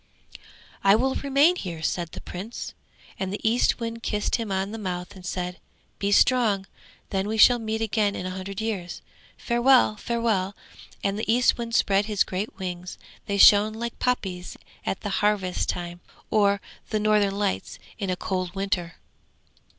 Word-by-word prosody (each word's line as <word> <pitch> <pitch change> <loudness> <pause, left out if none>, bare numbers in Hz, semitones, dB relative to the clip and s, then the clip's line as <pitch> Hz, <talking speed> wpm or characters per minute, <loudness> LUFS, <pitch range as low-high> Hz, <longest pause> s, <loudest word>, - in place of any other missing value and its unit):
'I 195 +1 +6
will 265 +4 +1
remain 280 +5 +3
here!' 170 - -6
said 170 -1 -1
the - - -7
Prince. 200 +7 -7 0.5
And 190 -1 -2
the 205 - -3
Eastwind 230 0 +1
kissed 210 -2 0
him 225 -4 -4
on 190 +1 -1
the 225 - -6
mouth 180 -2 -5
and 185 - -12
said: 180 0 -4 0.4
'Be 200 0 0
strong, 215 -4 +4 0.5
then 195 0 0
we 220 +1 -2
shall 245 +2 +7
meet 220 0 -3
again 215 -2 +1
in 180 - -4
a 185 - -3
hundred 190 +1 -6
years. 205 -6 -4 0.3
Farewell! 240 -2 +4
Farewell!' 215 -5 -1 0.5
And 200 +1 0
the 220 - 0
Eastwind 235 -1 +2
spread 200 -2 +3
his 210 -2 +2
great 190 +4 -4
wings; 180 -1 -5 0.3
they 200 - -1
shone 205 +2 +7
like 235 +1 -5
poppies 190 -8 -2 0.3
at 190 - -2
the 205 - -3
harvest 205 -3 +1
time, 175 0 -4 0.3
or 200 -2 +3 0.3
the 215 - 0
Northern 210 -2 +2
Lights 200 -2 -2 0.2
in 195 -3 -2
a 185 - +1
cold 185 0 -3
winter. 190 -3 -2
205 Hz, 160 wpm, -25 LUFS, 185-225 Hz, 0.5 s, shall